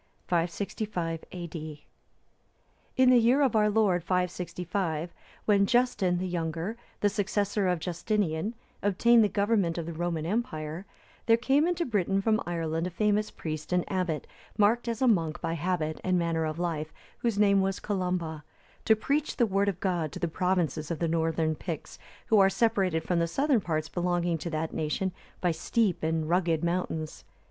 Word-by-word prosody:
[565 175 0 -2
A.D.] 155 -4 -7 1.1
In 255 -1 +6
the 250 - +7
year 245 +5 +4
of 255 -5 +2
our 210 -1 +4
Lord 205 -5 +2
565, 180 -2 -2 0.3
when 200 -2 +4
Justin, 230 -7 +2
the 185 +1 -2
younger, 170 +3 -3 0.3
the 205 - +4
successor 205 0 0
of 180 -1 +2
Justinian, 180 +3 -1 0.3
obtained 225 +4 +4
the 210 - +2
government 200 -5 +1
of 170 - -3
the 170 - -5
Roman 165 -1 -2
empire, 170 -4 -3 0.4
there 230 0 +6
came 275 +6 +3
into 350 -1 0
Britain 195 -4 +1
from 215 +2 +2
Ireland 165 0 -1
a - - -3
famous 210 +3 +1
priest 155 0 -6
and 180 -1 +2
abbot, 180 -5 -1 0.3
marked 220 +4 +3
as 230 +2 -1
a - - +4
monk 165 -9 +2
by 165 - -2
habit 165 -1 -2
and 185 -1 +2
manner 165 -2 0
of 155 0 -3
life, 160 -3 -2 0.3
whose 235 -4 0
name 200 -1 +4
was 195 0 -1
Columba,(301) 180 -6 -2 0.4
to 220 - +6
preach 285 +7 -1
the 240 - +4
word 200 -1 +1
of 185 -3 -4
God 175 -6 -1
to - - -6
the 175 - 0
provinces 170 -3 0
of 170 - -2
the 170 - 0
northern 160 -1 +1
Picts, 160 0 -6 0.3
who 220 - +4
are 195 0 +6
separated 195 -7 +1
from 175 0 0
the 170 - +1
southern 270 - +2
parts 155 -3 -2
belonging 175 0 0
to 170 - -4
that 160 0 -3
nation 160 +5 -1 0.3
by 180 - +2
steep 185 +4 0
and 160 0 0
rugged 170 -2 +1
mountains. 170 -3 -2
180 Hz, 170 wpm, -28 LUFS, 165-210 Hz, 1.1 s, the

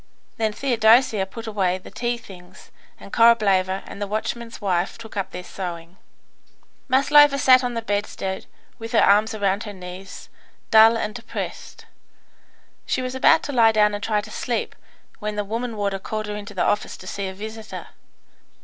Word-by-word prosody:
Then 220 -1 0
Theodosia 225 -4 +3
put 225 +4 -9
away 195 -4 0
the 185 - -13
tea 240 0 -2
things, 185 -4 -15 0.3
and - - -13
Korableva 195 -5 +3
and 200 - -10
the 205 - -2
watchman's 230 +3 -4
wife 185 -3 -1
took 225 -2 -11
up 195 -2 -2
their 180 - -7
sewing. 175 -2 -7 0.9
Maslova 280 +2 +5
sat 255 -2 +6
down 250 - -1
on 245 - -5
the 230 - -3
bedstead, 205 -2 -3 0.3
with 225 +1 -7
her 225 - +5
arms 210 +2 +4
round 200 +1 0
her 205 - -7
knees, 185 +1 -10 0.4
dull 225 +1 +7
and 215 -1 -3
depressed. 230 0 -7 1.0
She 255 - -1
was 255 0 -4
about 315 +5 +4
to - - -4
lie 225 -3 +5
down 210 -1 +3
and 205 0 -4
try 215 -2 +1
to - - -12
sleep, - - -3 0.5
when 210 0 -4
the 210 0 -2
woman 230 +2 -4
warder 200 -1 -1
called 215 +2 -4
her 210 0 -5
into 205 0 -8
the 185 - +1
office 210 - -1
to - - -13
see 195 +1 -4
a 190 - -6
visitor. 220 +2 -8
210 Hz, 175 wpm, -23 LUFS, 195-230 Hz, 1.0 s, dull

